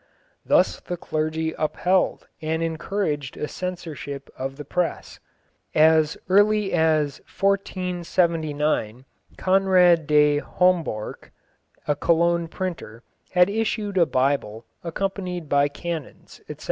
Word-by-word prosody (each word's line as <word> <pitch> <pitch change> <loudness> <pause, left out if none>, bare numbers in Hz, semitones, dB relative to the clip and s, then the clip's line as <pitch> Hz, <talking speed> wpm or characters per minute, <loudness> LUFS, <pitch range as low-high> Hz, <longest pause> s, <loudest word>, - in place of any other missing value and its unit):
Thus - - +3
the 175 - -5
clergy 160 0 -2
upheld 180 +4 0
and 160 +1 -1
encouraged 160 -4 -2
a 150 - -3
censorship 160 -7 -6
of 135 +1 -5
the 150 - -8
press. 175 +4 -3 0.6
As 155 0 +4
early 205 +1 +3
as 155 -4 +1 0.2
1479 170 - 0 0.3
Conrad 185 -4 +4
de 150 -1 +4
Homborch, 170 -11 -1 0.6
a 150 - +2
Cologne 170 +1 +2
printer, 165 - -6 0.3
had 180 0 +5
issued 215 -1 -2
a 170 - +4
Bible 130 -4 0 0.2
accompanied 180 -1 -3
by 140 0 +3
canons, 160 0 -7
etc. - - -7
165 Hz, 105 wpm, -24 LUFS, 150-180 Hz, 0.6 s, had